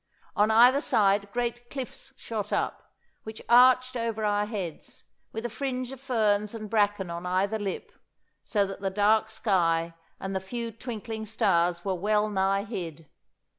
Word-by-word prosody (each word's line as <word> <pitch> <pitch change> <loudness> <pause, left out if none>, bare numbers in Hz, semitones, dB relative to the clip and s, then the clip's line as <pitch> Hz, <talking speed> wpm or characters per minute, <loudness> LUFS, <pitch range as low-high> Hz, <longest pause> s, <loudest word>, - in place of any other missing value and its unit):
On 210 +1 +3
either 245 +5 +6
side 200 -3 +2
great 240 0 -3
cliffs 265 -3 -7
shot 215 -3 -5
up, - - -2 0.3
which 220 0 -8
arched 255 +1 +6
over 230 -2 -2
our 205 0 +1
heads, 195 -7 -6 0.3
with 225 +2 -5
a - - +2
fringe 255 0 -3
of 270 - -9
ferns 215 -5 +1
and 215 -2 -7
bracken 205 -4 +1
on 170 +1 -5
either 195 +4 0
lip, 200 -2 -4 0.5
so 205 -3 +1
that 195 0 -7
the 195 - 0
dark 210 +3 +2
sky 170 -6 +1 0.3
and 195 0 -4
the - - +1
few 230 +5 -5
twinkling 225 -1 -6
stars 175 -5 +1
were 195 - 0
well 210 +3 +1
nigh 195 0 +1
hid. 165 -8 -7
210 Hz, 160 wpm, -27 LUFS, 195-230 Hz, 0.5 s, either